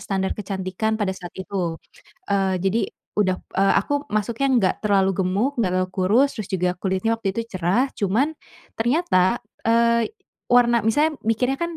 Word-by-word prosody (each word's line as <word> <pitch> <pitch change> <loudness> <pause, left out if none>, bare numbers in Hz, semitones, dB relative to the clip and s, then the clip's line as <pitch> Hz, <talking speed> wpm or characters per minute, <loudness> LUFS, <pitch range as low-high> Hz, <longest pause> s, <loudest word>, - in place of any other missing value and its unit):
standar 195 -1 -1
kecantikan 195 +2 -2
pada 200 -3 -1
saat 180 -2 -8
itu. 185 -3 -3 0.5
Eee, 195 -1 +2
jadi 200 +2 +1 0.3
udah 185 -2 +2 0.2
eee, 195 0 +4
aku - - -5 0.2
masuknya 225 +5 -1
nggak 190 -4 +2
terlalu 195 -2 +3
gemuk, 195 +9 +1
nggak 185 -5 +1
terlalu 185 0 0
kurus, 215 +9 +3
terus 215 -4 -5
juga 180 -1 +1
kulitnya 190 +4 0
waktu 195 -3 -3
itu 230 - 0 0.2
cerah, 200 +11 +1
cuman 225 +10 +1 0.5
ternyata, 240 - +2 0.3
eee, 235 0 +3 0.4
warna 240 -1 +4
misalnya 295 +7 +2
mikirnya 250 +4 +1
kan 340 -1 -3
205 Hz, 155 wpm, -23 LUFS, 190-235 Hz, 0.5 s, eee